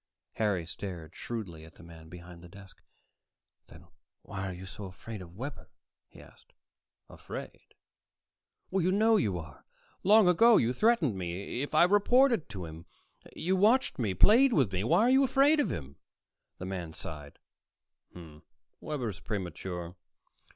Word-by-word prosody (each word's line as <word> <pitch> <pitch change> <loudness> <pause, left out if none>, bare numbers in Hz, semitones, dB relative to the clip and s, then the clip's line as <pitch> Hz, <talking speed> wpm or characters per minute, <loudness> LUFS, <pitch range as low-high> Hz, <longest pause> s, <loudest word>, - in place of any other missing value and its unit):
Harry 100 -6 0
stared 85 -2 -7
shrewdly 95 -9 -6
at 80 0 -15
the - - -16
man 80 -1 -13
behind 90 0 -12
the 85 - -13
desk. 100 +1 -15 0.9
"Then - - -15 0.4
why 95 -1 -5
are - - -4
you 90 +1 -9
so 95 +2 -9
afraid 100 +3 -9
of 90 0 -13
Webber?" 130 +4 -7 0.4
he - - -17
asked. - - -19 0.5
"Afraid?" - - -10 1.0
"You 185 -1 +1
know 220 +3 +4
you 100 - 0
are. 75 -5 -10 0.4
Long 210 +1 +5
ago 225 +6 +6
you 120 +2 +1
threatened 210 - +2
me, 90 +7 -4
if 145 +2 -4
I 155 - +6
reported 220 - +3
to 95 -4 -6
him. 80 +1 -11 0.5
You 185 +3 0
watched 220 - +2
me, 105 -6 -1
played 235 - +5
with 125 -10 +2
me. 95 +1 -1
Why 170 - +3
are 240 +3 +4
you 265 +1 +5
afraid 280 +3 +3
of 290 - +1
him?" 70 -3 -6 0.6
The 90 - -7
man 90 -4 -5
sighed. 75 -5 -9 1.4
"Webber 140 -7 -4
is 100 -2 -8
premature. 90 -4 -5
100 Hz, 150 wpm, -30 LUFS, -, 1.4 s, ago